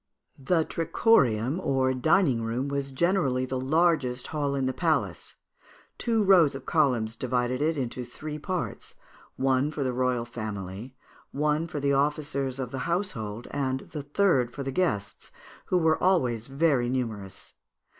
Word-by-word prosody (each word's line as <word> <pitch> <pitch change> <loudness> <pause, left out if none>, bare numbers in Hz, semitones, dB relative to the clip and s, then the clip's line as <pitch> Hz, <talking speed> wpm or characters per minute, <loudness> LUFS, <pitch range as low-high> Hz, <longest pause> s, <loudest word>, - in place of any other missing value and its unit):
The 160 +4 +1
trichorium, 140 - +2
or 130 -1 +1
dining 135 -1 +2
room, 120 +5 -2
was 140 -1 -3
generally 135 -4 +1
the 130 0 -3
largest 140 -4 +1
hall 145 -3 -2
in 135 -1 0
the 130 - 0
palace; 160 -1 -1 0.6
two 225 -3 +1
rows 180 -8 +5
of 135 - -8
columns 125 -9 +1
divided 125 +1 -1
it 160 +1 +1
into 125 -1 -3
three 150 +5 -7
parts; 180 +2 -4 0.4
one 135 +1 +1
for 150 -2 -3
the 130 -1 -1
royal 125 -1 0
family, 105 +1 -6 0.4
one 150 +3 0
for 155 - -4
the 140 0 +1
officers 140 -2 0
of 130 -3 -4
the 135 - -4
household, 120 - -2
and 130 -2 -1
the 150 - -7
third 145 -4 +2
for 140 - -6
the 135 - -3
guests, 110 - -2 0.3
who 185 - +1
were 160 -2 +2
always 125 - +2
very 135 -3 +1
numerous. 110 -7 -4
135 Hz, 150 wpm, -27 LUFS, 125-155 Hz, 0.6 s, rows